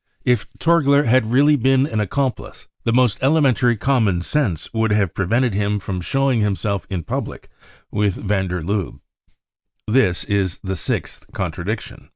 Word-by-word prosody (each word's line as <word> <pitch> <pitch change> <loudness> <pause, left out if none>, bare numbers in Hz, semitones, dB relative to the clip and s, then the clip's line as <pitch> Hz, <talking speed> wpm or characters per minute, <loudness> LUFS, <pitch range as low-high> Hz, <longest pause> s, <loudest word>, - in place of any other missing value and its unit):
If 125 -3 +1
Torgler 145 -4 +3
had 120 -1 +3
really 145 +4 +5
been 135 +1 +3
an 110 -7 -3
accomplice, 130 +6 -3 0.2
the 115 - +2
most 125 -3 +2
elementary 130 -4 +3
common 110 -8 +1
sense 110 - -1
would 110 0 +1
have 105 -4 +1
prevented 115 +5 +1
him 105 +1 0
from 95 -2 -4
showing 135 +3 +1
himself 100 -1 -1
in 90 -4 -3
public - - -5 0.4
with 105 -2 0
van 95 -2 -1
der 90 -1 -3
Lubbe. 100 +1 -3 0.9
This 110 -6 +2
is 95 -3 -1
the 95 -1 -3
sixth 80 - -4
contradiction. 105 +5 -5
110 Hz, 150 wpm, -20 LUFS, 95-130 Hz, 0.9 s, really